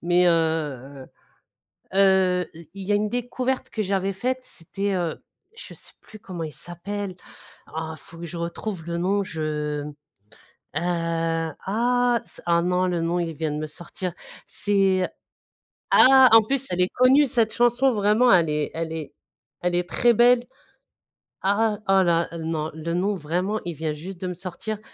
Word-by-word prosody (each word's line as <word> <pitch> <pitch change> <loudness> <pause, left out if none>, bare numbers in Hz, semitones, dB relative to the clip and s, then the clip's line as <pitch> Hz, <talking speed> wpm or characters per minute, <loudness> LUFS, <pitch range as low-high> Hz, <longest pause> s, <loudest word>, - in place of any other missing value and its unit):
Mais 175 +1 +3
heu 150 -5 -1 0.9
heu, 190 -2 +4
i 165 -1 -13
il 195 -1 -7
y 205 - +1
a - - +4
une 210 +1 +1
découverte 255 +2 -2
que 220 - -2
j'avais 195 0 -1
faite 255 +7 -2
c'était, 195 +1 -4
heu, 175 -3 -1 0.4
je - - -9
sais - - -9
plus 215 - -14
comment 180 -5 -7
il 155 - -6
s'appelle! 195 +3 -6 0.6
Oh 160 0 -4
faut 165 +3 -14
que 170 - -6
je 170 - -8
retrouve 170 +1 -5
le 170 0 -3
nom, 195 +3 +1
je 150 -3 -3
m 150 - -7 0.8
heu, 165 -1 -1
ah 240 +3 +2
ce - - -6
ah 170 0 +3
non 180 +1 +1
le 175 -2 -1
nom 170 +2 0
il 165 -1 -2
vient 155 0 -2
de 150 - -3
me 155 0 -3
sortir. 175 +3 -5 0.3
C'est 195 -2 +1 0.9
ah! 265 0 +8
En 225 0 +9
plus 270 +4 -1
elle 180 - -1
est 180 - +4
connue, 265 +4 +5
cette 230 -4 +1
chanson, 240 +2 +3
vraiment 215 +3 +3
elle 170 -4 +4
est 150 -1 -1
elle 165 0 -3
est 155 -3 -5 0.5
elle 175 0 -1
est 175 0 0
très 240 0 +3
belle. 240 +1 +5 1.0
Ah! 205 +2 +1
Oh 195 0 +5
là 170 -1 +2
non, 160 -1 -3
le 160 +2 -4
nom 195 +4 0
vraiment 180 +6 -2
il 175 - -3
vient 155 0 -2
juste 175 +5 -8
de 185 - -2
me 180 - -3
sortir. 185 +4 -5
180 Hz, 175 wpm, -24 LUFS, 165-210 Hz, 1.0 s, En